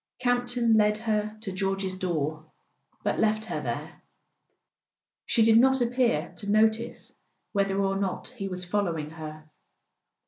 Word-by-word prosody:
Camp 245 0 +1
ton 240 -2 +3
led 210 -1 +4
her 215 -1 -1
to 200 - -5
George's 195 0 -1
door, 155 -4 -3 0.5
but - - 0
left 215 0 +2
her - - -3
there; - - -5 1.3
she 230 - +4
did 225 0 +6
not 265 +2 +5
appear 235 -9 +1
to 200 - -4
notice 220 +2 +1 0.4
whether 195 -1 +1
or 195 0 +1
not 195 -1 -2
he 225 -6 -6
was 180 -1 -3
following 175 -6 -1
her. 155 -1 -9
205 Hz, 140 wpm, -27 LUFS, 185-225 Hz, 1.3 s, did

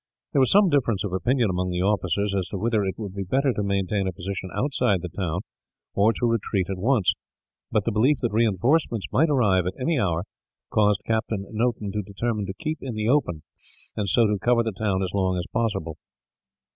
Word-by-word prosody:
There - - +3
was 130 - +4
some 200 -1 +5
difference 120 - +1
of 100 -3 -4
opinion, 120 +2 +1
among 90 0 -1
the 90 0 -1
officers, 100 0 0
as 95 -2 -1
to 100 - -5
whether 110 +1 +1
it 95 -1 -3
would 100 -4 -6
be 100 - -4
better 130 +8 +1
to 105 - -2
maintain 100 0 0
a - - 0
position 95 +2 -5
outside 125 - 0
the 90 - -7
town, 90 -2 -2 0.5
or 105 +3 +4
to 120 - -2
retreat 110 -5 0
at 95 - -4
once; 110 -2 +2 0.6
but 105 - +1
the 115 - +1
belief 125 +7 +3
that 120 - +1
reinforcements 115 - +1
might 160 +4 +3
arrive, 105 - +3
at 95 - -5
any 150 +3 +1
hour, 85 -4 0 0.5
caused 105 -2 +2
Captain 110 -2 -1
Noton 110 -2 -1
to 105 - -1
determine 105 +1 -3
to 95 - -4
keep 155 +3 -4
in 125 -4 -5
the 110 0 -1
open, 90 - +1 0.5
and 100 -2 -1
so 115 +5 +4
to 105 -1 0
cover 120 -1 +3
the 110 - -2
town 95 -2 0
as 90 - -4
long 95 -2 +1
as 90 - -2
possible. 105 -9 -2
105 Hz, 210 wpm, -25 LUFS, 95-120 Hz, 0.6 s, some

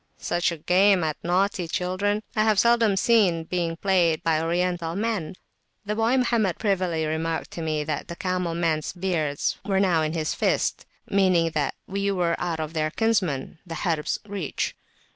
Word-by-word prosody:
Such 175 0 0
a 170 - -5
game 185 +3 +4
at 155 -1 -3
naughty 180 0 +1
children, 195 +5 -1
I 215 - +3
have 215 -2 +3
seldom 230 -2 +4
seen 185 -7 +3
played 170 -1 -1 0.4
even 160 -1 -1
by 160 -1 +2
Oriental 170 0 -1
men. 205 -5 -2 0.5
The 210 - -1
boy 225 +4 +2
Mohammed 230 -7 +1
[p.277] - - -32
privily 180 -6 0
remarked 160 +1 -2
to 170 - -6
me 155 -2 -1
that 150 -1 -3
the 170 - -6
camel 180 -2 -2
men's 160 -3 0
beards 170 -6 -1
were 195 -1 +1
now 180 -5 +3
in 155 0 -1
his 155 -2 -1
fist, - - 0 0.2
meaning 185 -4 +3
that 150 -3 -1
we 200 +1 -2
were 175 -3 +1
out 170 -2 -2
of 155 0 -4
their 155 -1 0
kinsmen, 180 - 0
the 165 -3 -7
Harb's, 160 -3 -1
reach. 195 -7 -3
175 Hz, 175 wpm, -25 LUFS, 160-200 Hz, 0.5 s, game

